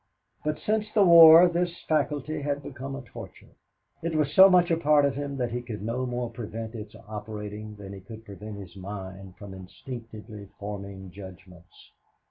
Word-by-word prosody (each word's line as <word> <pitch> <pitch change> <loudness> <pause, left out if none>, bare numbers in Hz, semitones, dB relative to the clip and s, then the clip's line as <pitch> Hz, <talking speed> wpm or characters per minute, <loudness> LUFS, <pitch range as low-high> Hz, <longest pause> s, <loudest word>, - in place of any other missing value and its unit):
But 150 0 -1
since 215 0 -1
the 210 -2 +4
war 170 0 +10
this 175 0 -2
faculty 150 -1 -1
had 145 0 -2
become 135 +1 -7
a 135 - -7
torture. 115 -6 -12 0.5
It 165 0 -3
was 150 -2 0
so 190 +3 +9
much 180 -1 +4
a 165 - +3
part 150 -2 +4
of 140 - +1
him 140 0 -5
that 125 -2 -2
he 120 +1 -3
could 110 -4 -7
no 125 +3 -2
more 120 -1 -3
prevent 115 0 -7
its 110 -2 -9
operating 105 0 -7
than 100 -1 -10
he 100 - -8
could 110 +4 -12
prevent 105 +1 -9
his 100 -2 -11
mind 95 -1 -8
from 100 -2 -10
instinctively 105 +1 -10
forming 100 -2 -7
judgments. 90 -2 -14
115 Hz, 175 wpm, -27 LUFS, 100-145 Hz, 0.5 s, war